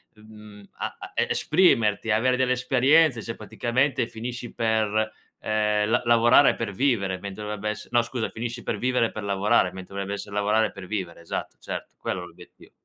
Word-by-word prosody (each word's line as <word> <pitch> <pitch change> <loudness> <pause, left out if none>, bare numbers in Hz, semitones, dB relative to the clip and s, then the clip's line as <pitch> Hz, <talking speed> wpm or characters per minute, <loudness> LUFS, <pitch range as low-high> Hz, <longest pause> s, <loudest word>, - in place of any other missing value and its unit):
mhmm, 105 -1 -14
a - - -4
a - - -9
e - - +1
esprimerti, 115 - +2
avere 125 +4 +2
delle 130 -1 +2
esperienze, 130 +2 +3
cioè, 115 +1 -6
praticamente 120 +4 0
finisci 120 +1 -6
per, 110 -1 +1 0.3
ehm, 105 -1 +1
la 120 - +3
lavorare 120 +4 +5
per 115 -3 -3
vivere 100 -5 0
mentre 100 +2 -7
dovrebbe 105 0 -3
essere 105 0 -6
no 120 0 +4
scusa, 120 0 -3
finisci 120 +1 -5
per 105 - -2
vivere 125 0 +1
per 110 - -6
lavorare 100 0 +2
mentre 95 0 -10
dovrebbe 100 0 -3
essere 100 0 -8
lavorare 105 +2 +2
per 100 -2 -10
vivere, 95 -5 -4
esatto, 85 - -5
certo - - -7
quello 90 - -3
è - - -7
l'obiettivo. 85 -1 -16
110 Hz, 175 wpm, -25 LUFS, 105-120 Hz, 0.3 s, lavorare